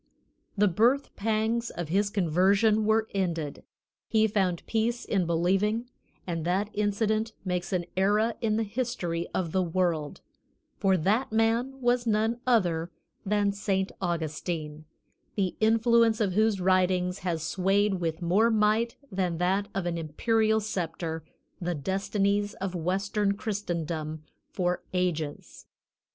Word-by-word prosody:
The 205 +1 +4
birth 240 +9 +2
pangs 225 +2 0
of 175 -3 -5
his 200 +4 +2
conversion 200 +4 +3
were 220 +1 +2
ended; 170 -7 -2 0.5
he 220 -1 +3
found 190 -5 0
peace 230 +2 -1
in 190 -5 0
believing; 195 +8 +1 0.3
and 165 -3 -3
that 190 +5 0
incident 215 +2 0
makes 180 -1 -2
an 180 -2 0
era 210 +4 +2
in 215 -2 +1
the 225 - +1
history 205 -7 -2
of 170 -4 -2
the 190 - +2
world, 170 -4 -1 0.6
for 190 -2 +3
that 215 +10 +1
man 230 +4 +1
was 245 -1 +1
none 220 +2 +1
other 175 -9 +2 0.4
than 205 0 +2
Saint 195 -1 -1
Augustine, 155 -2 -3 0.5
the 190 -3 0
influence 225 0 +4
of 200 -4 +1
whose 215 0 +2
writings 185 0 +2
has 170 -5 -2
swayed 195 +2 +1
with 165 +1 -2
more 200 +7 +3
might 220 +1 +2 0.2
than 185 -3 -1
that 190 +4 +1
of 195 -2 -1
an 170 -1 -1
imperial 220 +8 +1
sceptre 165 -6 -3 0.4
the 175 0 -1
destinies 200 +5 0
of 190 -1 -4
western 195 +4 0
Christendom 170 -8 -3 0.3
for 180 -1 -1
ages. 160 -5 -3
195 Hz, 130 wpm, -28 LUFS, 175-220 Hz, 0.6 s, The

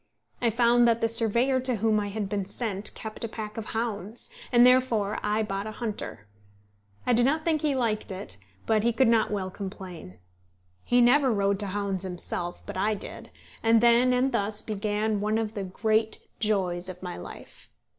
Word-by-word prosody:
I 240 - +3
found 235 +1 +4
that 230 -1 +3
the 230 - +2
surveyor 235 +3 +2
to 255 -1 0
whom 220 0 +2
I 205 - -2
had 205 0 -3
been 200 -1 -2
sent 200 0 -3
kept 220 +1 -7
a - - -1
pack 215 -1 -7
of 225 -1 -5
hounds, 225 - -4 0.2
and 240 -1 +7
therefore 245 -5 +3
I 210 +1 0
bought 200 0 -3
a 215 - -6
hunter. 210 - -5 0.8
I 250 - +3
do 235 - +4
not 310 +5 +1
think 315 -3 +1
he 295 -3 +1
liked 225 -4 -1
it, 185 - -7 0.3
but 220 -1 +2
he 235 +2 +1
could 260 +2 +3
not 230 -1 +3
well 190 -3 -3
complain. 185 - -8 0.7
He 245 0 +3
never 260 +2 +5
rode 200 -2 +1
to 205 - -2
hounds 195 -1 -2
himself, 175 -1 -4
but - - -6
I 210 +3 +1
did; 200 - -9 0.3
and 225 0 +5
then 240 +2 +5
and 250 +2 +2
thus 210 -2 -1
began 210 0 -1
one 215 +1 +1
of 220 -1 -2
the 200 -3 -4
great 220 +3 0
joys 185 -4 0
of 185 0 -9
my 180 - -5
life. - - -11
215 Hz, 190 wpm, -27 LUFS, 200-235 Hz, 0.8 s, and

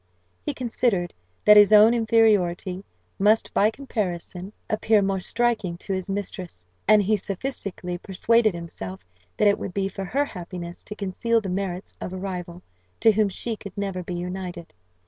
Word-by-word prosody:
He - - -3
considered 225 -7 0 0.3
that 210 0 +9
his 205 0 +8
own 215 +2 +8
inferiority 205 -5 +2 0.4
must 210 +3 +3
by 210 - +4
comparison 195 -7 -4 0.2
appear 215 -1 +2
more 195 0 0
striking 220 -4 0
to 195 - -4
his 185 0 -3
mistress; 185 - -5 0.2
and 210 0 +6
he 215 +3 +2
sophistically 195 -4 -4
persuaded 215 +2 +2
himself 95 - -7 0.3
that 210 - +4
it 200 - +3
would 180 - -6
be 195 -1 +1
for 195 0 -5
her 275 +10 0
happiness 175 -5 -8
to 210 - -7
conceal 215 +4 0
the 200 -4 -5
merits 185 0 -3
of 185 - -5
a - - -4
rival, 180 -2 -6 0.4
to 225 - +7
whom 215 -1 +2
she 225 +4 -3
could 200 -2 -11
never 195 -2 -2
be 180 0 -5
united. 180 -1 -6
195 Hz, 165 wpm, -24 LUFS, 180-215 Hz, 0.4 s, that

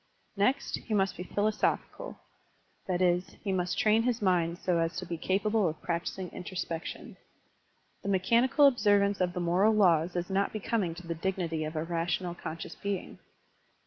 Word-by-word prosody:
Next, 255 +8 +1
he 220 - -3
must 195 -1 +1
be - - -7
philosophical, 215 - -1 0.7
that 185 -1 +1
is, 180 0 +1
he 200 - -1
must 180 -1 -1
train 220 -1 +4
his 240 0 0
mind 175 -4 +1
so 175 -1 0
as 165 +1 -1
to 180 - -4
be 170 - -4
capable 200 +3 +1
of 155 - -7
practising 175 +2 -3
introspection. 180 -2 -6 0.8
The - - -4
mechanical 235 +9 +4
observance 205 -6 +3
of 180 -1 +1
the 180 - -3
moral 180 +5 +3
laws 175 -4 +3
is 175 0 -1
not 195 +1 +1
becoming 205 -5 -1
to 175 0 -10
the 170 - -2
dignity 165 -2 -2
of 155 +1 -6
a 155 - -1
rational, 170 +1 -1
con 165 -2 -6
scious - - -8
being. 200 -2 -4
185 Hz, 170 wpm, -30 LUFS, 170-205 Hz, 0.8 s, train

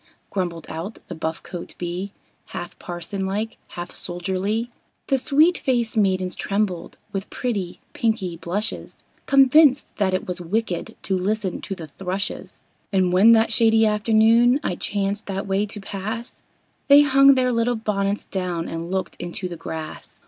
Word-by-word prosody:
Grumbled 175 -4 -3
out 170 +7 -6
the - - -4
buff 160 0 -4
coat 175 -2 -8
Bee, 180 +3 -4 0.5
Half - - -7
parson 180 +2 -4
like, 210 +3 -3 0.2
half 175 +1 -5
soldierly. 190 +6 -2 0.4
The 270 - +4
sweet 310 +7 +4
faced 240 -4 0
maidens 185 -3 +1
trembled, 195 -4 -2
with 195 -1 -4
pretty, 200 -8 -3
pinky 215 -7 -1
blushes, 190 +6 -4 0.2
Convinced 275 +1 +5
that 190 -3 +2
it 185 - -3
was 180 0 -4
wicked 185 +1 -2
to 190 - 0
listen 195 0 -1
to 195 - -4
the 170 -3 -8
thrushes; 190 +5 -4 0.3
And 185 -2 +2
when 210 +5 +7
that 225 0 +4
shady 225 0 +4
afternoon, 225 +4 +4
I 180 - -1
chanced 200 +2 -2
that 195 0 -3
way 195 +1 0
to 210 - -5
pass, 210 +4 -6 0.5
They 285 +1 +8
hung 275 -1 +6
their 255 -1 +2
little 235 +1 +1
bonnets 205 -2 -1
down 180 -3 -3
and 165 +1 -5
looked 185 -2 -2
into 175 +2 -4
the 175 - -6
grass. 160 -1 -7
200 Hz, 155 wpm, -23 LUFS, 180-225 Hz, 0.5 s, They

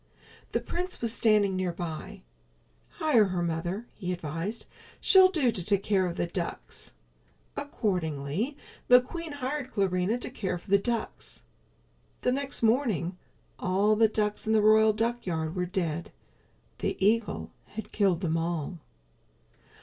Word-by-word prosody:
The - - +1
prince 360 +2 -3
was 230 -1 0
standing 210 -4 +3
nearby. 175 -3 -4 0.7
"Hire 255 -9 +4
her, 180 -2 -1
mother," 170 +6 -2
he 180 -3 -4
advised. 175 +5 -4 0.3
"She'll 375 -1 +7
do 300 -10 +2
to 185 - 0
take 200 +1 +2
care 195 -3 +2
of 170 - -5
the - - +1
ducks." 170 - -4 0.6
Accordingly, 180 - -2 0.3
the 250 0 +9
queen 330 +6 -6
hired 270 -1 -3
Clarinha 195 +2 +1
to - - -4
care 190 -7 -2
for 185 +3 -13
the 200 - +6
ducks. 230 - -3 0.8
The 250 - +2
next 275 -1 -1
morning 220 - +2 0.4
all 200 +3 +2
the 225 +1 +5
ducks 210 0 -1
in 220 - +3
the 215 -1 +4
royal 215 0 +6
duckyard 200 -8 -2
were 180 -1 -1
dead. 170 -3 -2 0.7
The - - -1
eagle 215 +3 +1 0.2
had 220 +1 -6
killed 190 -5 +2
them 165 -3 0
all. 165 0 -2
200 Hz, 140 wpm, -28 LUFS, 175-230 Hz, 0.8 s, the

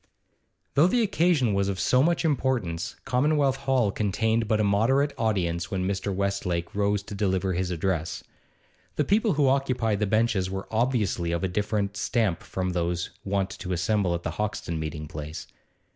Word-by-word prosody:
Though 150 +5 +5
the 235 +5 +2
occasion 165 - +2
was 100 0 +1
of 95 -1 -3
so 125 - +3
much 170 +3 +2
importance, 125 - -1
Commonwealth 140 +1 +2
Hall 130 -6 +1
contained 110 +3 0
but 110 0 +2
a - - +3
moderate 125 +8 +2
audience 90 -8 -1
when 95 -2 -1
Mr. 100 +1 -2
Westlake 95 -3 -2
rose 100 0 +1
to 100 - -9
deliver 95 -2 0
his 90 +1 -1
address. 85 -2 -2 0.7
The 150 - +1
people 210 - +2
who 145 -2 +3
occupied 125 -6 +1
the 105 - +1
benches 110 -3 +1
were 95 0 -5
obviously 110 -7 0
of 85 +2 -1
a - - +2
different 100 +1 -1
stamp 100 -4 0
from 90 -1 -3
those 85 0 -1
wont 100 -1 -1
to 90 -1 -3
assemble 90 0 +1
at 85 - -5
the - - -2
Hoxton 105 -6 -3
meeting 75 -1 -5
place. 75 +2 -7
100 Hz, 170 wpm, -26 LUFS, 90-125 Hz, 0.7 s, Though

